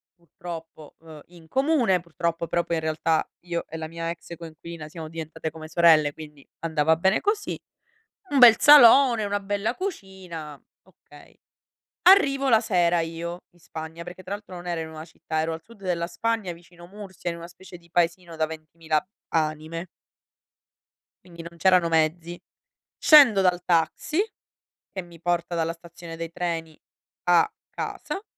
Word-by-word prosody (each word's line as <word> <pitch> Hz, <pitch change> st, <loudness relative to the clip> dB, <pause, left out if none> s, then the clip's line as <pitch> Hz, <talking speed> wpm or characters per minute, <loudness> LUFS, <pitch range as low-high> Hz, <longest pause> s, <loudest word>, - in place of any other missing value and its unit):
purtroppo, 170 Hz, -3 st, -10 dB
uhm, 160 Hz, -2 st, -13 dB
in 170 Hz, -2 st, -17 dB
comune, 260 Hz, -, +2 dB
purtroppo, 170 Hz, 0 st, -3 dB
però, 170 Hz, +2 st, 0 dB
poi 170 Hz, -, -2 dB
in 160 Hz, -, -2 dB
realtà, 160 Hz, 0 st, 0 dB
io 170 Hz, -1 st, -4 dB
e 165 Hz, -, -7 dB
la 160 Hz, -1 st, -5 dB
mia 165 Hz, +1 st, -5 dB
ex 170 Hz, 0 st, -7 dB
coinquilina 165 Hz, -1 st, -9 dB
siamo 160 Hz, 0 st, -8 dB
diventate 160 Hz, 0 st, -6 dB
come 155 Hz, 0 st, -10 dB
sorelle, 160 Hz, -3 st, +4 dB
quindi 150 Hz, -2 st, -12 dB
andava 160 Hz, -1 st, +2 dB
bene 190 Hz, +5 st, +2 dB
così, 415 Hz, 0 st, -1 dB, 0.7 s
un 285 Hz, -, +2 dB
bel 235 Hz, -3 st, +10 dB
salone, 265 Hz, -5 st, +7 dB
una 205 Hz, 0 st, -1 dB
bella 205 Hz, +3 st, -2 dB
cucina, 190 Hz, -, -7 dB, 0.2 s
okay. -, -, -19 dB, 0.7 s
Arrivo 275 Hz, -8 st, +5 dB
la 225 Hz, -2 st, +6 dB
sera 175 Hz, -6 st, +2 dB
io 165 Hz, +2 st, -5 dB
in 175 Hz, -, -26 dB
Spagna, 160 Hz, 0 st, -8 dB
perché 175 Hz, +2 st, -10 dB
tra 195 Hz, -, -5 dB
l'altro 205 Hz, -3 st, -8 dB
non 175 Hz, 0 st, -9 dB
ero 170 Hz, -2 st, -2 dB
in 160 Hz, -, -6 dB
una 155 Hz, 0 st, -9 dB
città, 160 Hz, -1 st, -5 dB
ero 160 Hz, +1 st, -1 dB
al 160 Hz, -, -7 dB
sud 220 Hz, +1 st, -18 dB
della 170 Hz, -2 st, -1 dB
Spagna, 225 Hz, -3 st, -2 dB
vicino 175 Hz, 0 st, -14 dB
Murcia, 190 Hz, -2 st, -7 dB
in 170 Hz, -, -5 dB
una 170 Hz, 0 st, -9 dB
specie 180 Hz, +1 st, -13 dB
di 170 Hz, 0 st, -23 dB
paesino 170 Hz, 0 st, -1 dB
da 160 Hz, 0 st, +1 dB
20000 160 Hz, 0 st, -4 dB
ab 170 Hz, -, -2 dB, 0.2 s
anime. 160 Hz, +2 st, -2 dB, 1.4 s
Quindi, 170 Hz, -2 st, -11 dB
non 170 Hz, 0 st, -11 dB
c'erano 180 Hz, -1 st, +4 dB
mezzi, 165 Hz, +2 st, 0 dB, 0.6 s
scendo 270 Hz, -10 st, +7 dB
dal 180 Hz, -1 st, +2 dB
taxi, 175 Hz, -, 0 dB, 0.7 s
che 190 Hz, -, -5 dB
mi 170 Hz, -2 st, -15 dB
porta 175 Hz, 0 st, -1 dB
dalla 165 Hz, 0 st, -1 dB
stazione 170 Hz, 0 st, -11 dB
dei 165 Hz, 0 st, -6 dB
treni 165 Hz, -3 st, -4 dB, 0.5 s
a 175 Hz, -2 st, +4 dB, 0.2 s
casa, 395 Hz, -, -5 dB
170 Hz, 160 wpm, -25 LUFS, 160-190 Hz, 1.4 s, bel